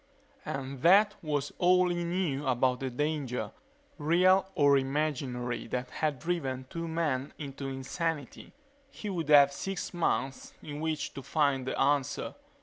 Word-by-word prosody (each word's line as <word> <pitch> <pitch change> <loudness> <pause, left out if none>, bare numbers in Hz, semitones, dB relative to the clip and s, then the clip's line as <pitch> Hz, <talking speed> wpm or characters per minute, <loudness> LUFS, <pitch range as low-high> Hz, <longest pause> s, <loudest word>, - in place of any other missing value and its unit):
And 135 -1 -4
that 205 +5 +6
was 145 -3 -2
all 180 0 +4
he 175 0 -1
knew 170 -6 -1
about 125 0 +2
the 135 - -2
danger, 140 -1 -2 0.5
real 180 +5 +4
or 145 -2 +5
imaginary, 135 -4 -1
that 125 +2 -3
had 150 -3 -1
driven 135 -4 -2
two 165 0 -4
men 150 -5 -1
into 140 -2 -6
insanity. 140 +2 -4 0.4
He 210 -6 -6
would 165 -5 -3
have 140 -1 +7
six 195 +6 -4
months 135 -6 -1
in 145 -1 -6
which 155 -1 -2
to 135 - -7
find 140 -3 +1
the - - -2
answer. 140 -1 +1
145 Hz, 145 wpm, -30 LUFS, 135-170 Hz, 0.5 s, have